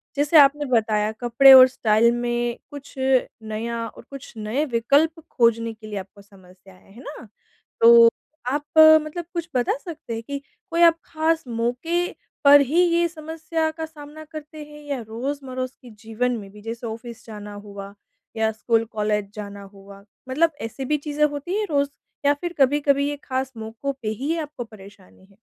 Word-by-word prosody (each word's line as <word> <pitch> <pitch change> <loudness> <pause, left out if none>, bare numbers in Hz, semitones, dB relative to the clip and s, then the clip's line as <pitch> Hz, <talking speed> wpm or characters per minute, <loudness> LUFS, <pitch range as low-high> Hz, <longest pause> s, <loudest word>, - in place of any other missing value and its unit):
जैसे 290 +3 +3
आपने 290 +1 +5
बताया 215 -2 +1
कपड़े 255 +3 +7
और 260 0 +10
स्टाइल 230 -2 +2
में 240 0 -2
कुछ 285 -1 -11
नया 230 -3 -1
और - - -13
कुछ 275 -3 -10
नए 220 +8 -1
विकल्प 290 +8 +2
खोजने 230 -1 +2
के 220 0 -13
लिए 205 -2 -4
आपको 200 +2 -12
समस्या 190 -1 -19
है, 185 +1 -22
है 240 - -13
ना? 285 -6 -10 0.5
तो 230 0 +8 0.4
आप, 290 +1 -2 0.4
मतलब 330 +3 -6
कुछ 340 0 -4
बता 245 +2 +1
सकते 300 -7 -8
हैं 225 0 -5
कि 280 +3 -5 0.3
कोई 335 +1 +1
आप 330 -1 +6
ख़ास 320 0 0
मौके 250 +10 -1 0.4
पर 285 0 +8
ही 300 +6 +2
ये 340 0 +3
समस्या 320 0 -3
का 320 0 -6
सामना 310 0 -12
करते 305 0 -10
हैं, 295 0 -13
या 280 -3 -4
रोज़-मरोज़ 255 +2 -4
के 250 - -13
जीवन 225 +3 -3
में 200 -2 -9
भी 210 - -14
जैसे 230 +2 -6
ऑफिस 230 +1 -9
जाना 210 -2 -9
हुआ 200 0 -9 0.4
या 220 0 +1
स्कूल 225 +1 0
कॉलेज 210 -2 -2
जाना 205 -1 -8
हुआ 195 0 -14 0.3
मतलब 325 +5 +2
ऐसी 245 +4 -5
भी 300 +3 +1
चीज़ें 295 +1 0
होती 300 +7 -3
हैं 425 - -1
रोज़ 280 -1 +1 0.4
या 285 - +5
फ़िर 345 0 -4
कभी-कभी 280 +1 +2
ये 290 - -4
ख़ास 260 0 -3
मौकों 225 +5 -5
पे 215 - -2
ही 260 +8 -4
ये 335 - -1
आपको 290 -5 -7
परेशानी 200 -3 -16
है? 195 0 -25
250 Hz, 175 wpm, -23 LUFS, 220-295 Hz, 0.5 s, और